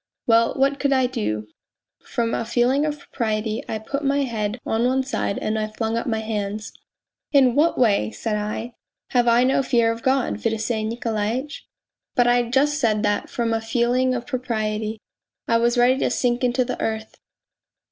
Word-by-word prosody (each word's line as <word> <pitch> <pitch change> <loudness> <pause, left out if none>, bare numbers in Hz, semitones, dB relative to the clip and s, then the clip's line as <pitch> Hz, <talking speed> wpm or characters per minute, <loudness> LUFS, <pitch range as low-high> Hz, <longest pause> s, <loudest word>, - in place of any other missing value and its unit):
Well, 230 0 +3
what 275 +1 +1
could 280 - +1
I 260 -1 +3
do? 210 - -2 0.6
From 230 -1 -2
a - - 0
feeling 245 +5 +2
of 300 -1 -3
propriety 220 -5 -2
I 220 - -1
put 275 +7 -4
my 280 0 +2
head 225 -2 -3
on 225 +1 0
one 260 +2 +2
side 260 -6 -2
and 215 0 -1
I 215 - -1
flung 220 +1 -3
up 230 - -2
my 220 -2 0
hands. 210 -1 -4 0.3
' - - -67
In 265 -4 +5
what 300 +5 +2
way,' 205 - +3
said 210 - -3
I, 215 +3 -4 0.2
' - - -66
have 245 -1 +3
I 235 +1 +5
no 265 +1 +3
fear 235 -3 +2
of 230 0 -5
God, 260 -4 0
Fedosey 220 0 -1
Nikolaitch? 230 +4 -3 0.2
' - - -65
But 245 - +4
I 245 -1 +2
just 290 +4 +2
said 215 -5 +1
that 205 -1 0
from 230 -1 -1
a 225 - 0
feeling 245 +3 +1
of 240 -1 -4
propriety... 220 -4 -2 0.5
I 230 - +3
was 240 +1 +2
ready 250 +2 +4
to - - +1
sink 245 0 0
into 250 +1 +2
the 250 - -4
earth. 220 0 -3
235 Hz, 190 wpm, -23 LUFS, 220-255 Hz, 0.6 s, In